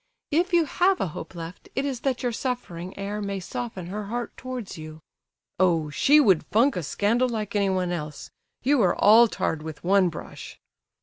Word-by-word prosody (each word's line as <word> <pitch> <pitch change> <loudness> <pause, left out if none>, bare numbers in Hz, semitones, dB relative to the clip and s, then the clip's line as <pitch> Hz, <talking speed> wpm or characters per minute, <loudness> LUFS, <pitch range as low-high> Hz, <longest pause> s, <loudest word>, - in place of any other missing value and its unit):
If 345 +6 +2
you 340 -2 +4
have 365 +5 +2
a 185 - -1
hope 160 +3 -8
left, 165 +1 -9
it 270 - 0
is 265 -4 -2
that 260 0 -1
your 245 - +1
suffering 205 -8 -4
air 200 +2 -4
may 200 -1 -3
soften 195 0 -5
her 205 +4 -5
heart 240 +3 -4
towards 255 -4 -6
you." 155 0 -9 0.6
"Oh, 165 -5 +2
she 290 - +5
would 190 - +4
funk 250 +6 +3
a 180 - -1
scandal 225 - +1
like 215 -2 -4
anyone 190 -3 +1
else. 150 -4 -6 0.3
You 275 0 +3
are 180 -3 +3
all 225 +3 +7
tarred 160 -7 -2
with 155 -1 -8
one 190 0 +4
brush!" 160 - -9
205 Hz, 185 wpm, -25 LUFS, 175-250 Hz, 0.6 s, all